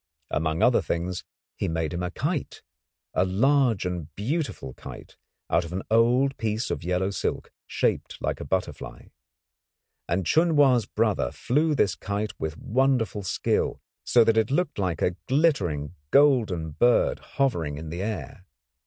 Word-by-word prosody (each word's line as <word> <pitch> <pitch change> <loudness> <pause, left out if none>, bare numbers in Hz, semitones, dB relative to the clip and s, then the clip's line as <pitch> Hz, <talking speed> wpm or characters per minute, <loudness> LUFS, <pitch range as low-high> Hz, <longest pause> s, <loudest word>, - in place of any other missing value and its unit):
Among 80 +1 0
other - - +5
things 85 +1 -3 0.3
he - - -2
made 80 -1 -2
him 85 - -3
a 90 - -2
kite 145 - -3 0.5
a - - +3
large 115 +2 +2
and 90 -4 -3
beautiful 125 - -3
kite - - -11 0.3
out 85 - +2
of 85 - -8
an 95 - -3
old 125 +4 +3
piece 110 +1 -2
of - - -3
yellow 90 +2 0
silk, - - -3 0.2
shaped - - -1
like - - -2
a - - -5
butterfly. 90 +6 -4 1.0
And 90 +2 0
Chun 160 - +3
Wa's 130 -7 +4
brother 60 - 0
flew 150 +4 +1
this 100 -8 +2
kite 100 +2 -3
with 80 0 -4
wonderful 125 -3 +1
skill, 95 - -1 0.2
so 120 - +5
that 115 0 +2
it 110 -1 +3
looked 160 -2 0
like 90 -4 -1
a 90 - 0
glittering 100 - +1 0.2
golden 115 - +3
bird 120 +10 +3 0.2
hovering 85 - 0
in 80 +1 -7
the 85 +2 -4
air. 95 - -5
105 Hz, 155 wpm, -26 LUFS, 85-130 Hz, 1.0 s, other